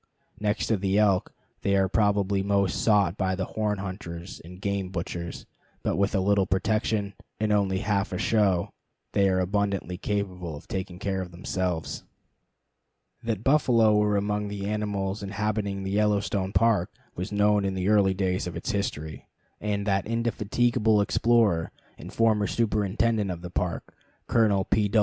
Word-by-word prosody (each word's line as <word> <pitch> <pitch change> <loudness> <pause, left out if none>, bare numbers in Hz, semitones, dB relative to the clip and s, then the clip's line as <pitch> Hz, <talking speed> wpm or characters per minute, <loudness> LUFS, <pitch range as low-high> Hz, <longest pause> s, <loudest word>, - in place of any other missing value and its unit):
Next 105 +1 0
to 110 - +1
the 95 +1 0
elk, 100 -3 +3 0.3
they 100 - +1
are 95 -1 +3
probably 100 -1 +2
most 100 -2 +1
sought 100 -4 +3
by 95 -1 0
the 95 0 -2
horn 105 0 -1
hunters 95 -2 -7
and 90 +2 -11
game 100 -1 -2
butchers; 85 -1 -5 0.4
but - - 0
with 100 +2 +1
a - - +3
little 100 0 +2
protection, 105 +1 0 0.3
and 110 0 +1
only 100 -2 +2
half 100 -2 0
a 90 - -2
show, 95 -4 +1 0.4
they 100 -1 +3
are 95 0 +2
abundantly 95 -1 -1
capable 90 -5 -3
of 75 - -12
taking 95 -2 -4
care 95 0 -2
of 90 - -6
themselves. 90 -1 -3 1.2
That 115 -3 -3
buffalo 120 -7 +4
were 105 -1 +3
among 105 +1 -1
the 100 -1 -5
animals 105 -1 -2
inhabiting 100 -1 -2
the 95 - -3
Yellowstone 100 -2 +1
Park 105 -2 +2 0.2
was 90 +3 -4
known 105 0 +3
in 95 -1 -1
the 95 0 -1
early 100 -3 +4
days 90 -1 -1
of 90 - -6
its 85 - -3
history; 80 -6 -4 0.3
and 100 -1 -2
that 100 -1 0
indefatigable 115 -1 +1
explorer 105 -5 +2 0.3
and - - -9
former 110 -3 +2
superintendent 110 -1 +1
of 85 -1 -5
the 90 - -7
Park, 90 -1 -3 0.3
Colonel 105 -4 +3
P. 105 0 +1
100 Hz, 160 wpm, -26 LUFS, 95-105 Hz, 1.2 s, buffalo